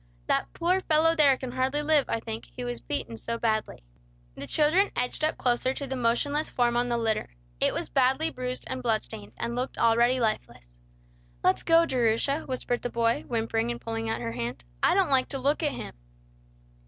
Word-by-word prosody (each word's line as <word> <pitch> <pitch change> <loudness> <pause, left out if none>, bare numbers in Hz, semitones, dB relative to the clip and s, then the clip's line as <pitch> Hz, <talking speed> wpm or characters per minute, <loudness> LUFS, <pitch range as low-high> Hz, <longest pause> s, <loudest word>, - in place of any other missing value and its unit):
That - - 0
poor 360 +3 +1
fellow 325 0 +3
there 285 -4 +5
can 255 -1 -6
hardly 260 +4 0
live, 300 -3 +3
I 230 - 0
think, 225 0 -6
he 250 - -8
was 245 0 -4
beaten 115 - -4
so 230 - -3
badly." 215 - -1 0.5
The 140 - -7
children 320 - +3
edged 250 +4 -1
up 310 - +1
closer 255 +1 +1
to 280 - -4
the 265 0 -4
motionless 260 +5 +1
form 240 -1 +1
on 245 +1 +1
the 235 - +1
litter. 225 -2 -1 0.3
It - - +3
was - - -3
badly 270 +5 +2
bruised 255 -1 -4
and 260 0 -4
blood 225 -3 +1
stained, 105 +1 -9
and 235 - -3
looked 255 +2 -3
already 235 +2 +3
lifeless. 120 - -2 0.7
"Let's 125 - +3
go, 330 0 +5
Jerusha," 255 +2 0
whispered 250 -2 -2
the 245 - -3
boy, 230 0 0
whimpering 225 -1 -1
and 240 0 -3
pulling 225 0 -4
at 225 - -2
her 115 - -3
hand. 120 - -4 0.2
"I - - +4
don't - - +2
like 260 -1 +3
to 275 - -2
look 280 +4 +1
at 300 -3 +1
him." - - -7
245 Hz, 200 wpm, -27 LUFS, 230-280 Hz, 0.7 s, there